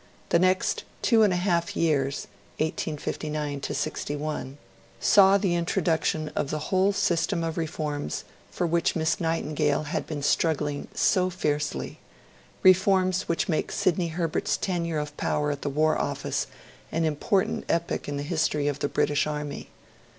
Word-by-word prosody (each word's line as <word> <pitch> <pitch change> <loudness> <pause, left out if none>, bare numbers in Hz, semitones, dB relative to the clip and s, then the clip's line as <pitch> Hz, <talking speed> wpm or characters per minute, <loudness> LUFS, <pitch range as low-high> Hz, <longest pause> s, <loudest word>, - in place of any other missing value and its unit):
The 170 - +4
next 185 +1 +2 0.2
two 230 -2 +5
and 210 -3 +5
a - - +1
half 175 -2 0
years 140 -4 +1 0.3
(1859 150 -2 -3
61) 145 -1 -3 0.4
saw 195 -1 +6
the 190 -3 0
introduction 165 -3 0
of 145 - -2
the 155 -1 -4
whole 190 +2 +4
system 170 -3 +1
of 165 -1 -2
reforms 155 - -3 0.3
for 175 - -2
which 170 0 +1
Miss 160 -1 +1
Nightingale 155 -3 0
had 150 - -3
been 145 -3 -4
struggling 145 -1 +1
so 185 -3 +3
fiercely 150 -5 -2 0.6
reforms 185 0 +4
which 170 - 0
make 160 - -1
Sidney 185 -3 +1
Herbert's 165 -1 -1
tenure 170 -4 -1
of 150 0 -4
power 150 0 0
at 145 - -5
the 145 - -2
War 155 +3 +2
Office - - -2 0.4
an 165 0 0
important 160 +5 0
epoch 170 -3 -1
in 145 - -2
the 140 - -3
history 150 -2 0
of 145 -1 -1
the 145 - -1
British 145 +1 +1
Army. 150 -1 -4
160 Hz, 145 wpm, -26 LUFS, 150-175 Hz, 0.6 s, saw